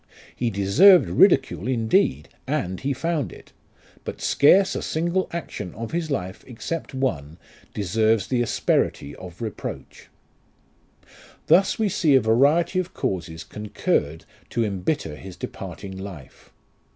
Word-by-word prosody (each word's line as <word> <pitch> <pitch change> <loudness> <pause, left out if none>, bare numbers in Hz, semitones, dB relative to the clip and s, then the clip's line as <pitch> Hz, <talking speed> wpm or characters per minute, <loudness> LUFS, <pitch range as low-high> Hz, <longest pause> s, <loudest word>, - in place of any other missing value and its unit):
He 120 - -1
deserved 115 - +6
ridicule, 90 +4 +3
indeed, 110 - +1 0.2
and 90 +1 -2
he 140 - -2
found 145 - -2
it; - - -15 0.5
but - - -6
scarce 190 +7 +4
a - - -2
single 170 +4 -1
action 120 - -6
of 115 0 -6
his 165 -1 -2
life, 95 -9 -4
except 135 +5 -5
one, 80 - -2 0.4
deserves 110 +1 +1
the 125 -2 0
asperity 70 -9 0
of 90 +3 -9
reproach. 110 - -7 1.4
Thus 190 +2 +4
we 220 - +1
see 155 -6 +2
a - - +7
variety 140 - +3
of 185 0 -4
causes 80 -3 -3
concurred 80 -7 -2 0.2
to 115 - 0
embitter 95 - -2
his 95 0 -10
departing 95 -1 -7
life. 95 -8 -10
115 Hz, 125 wpm, -23 LUFS, 95-155 Hz, 1.4 s, a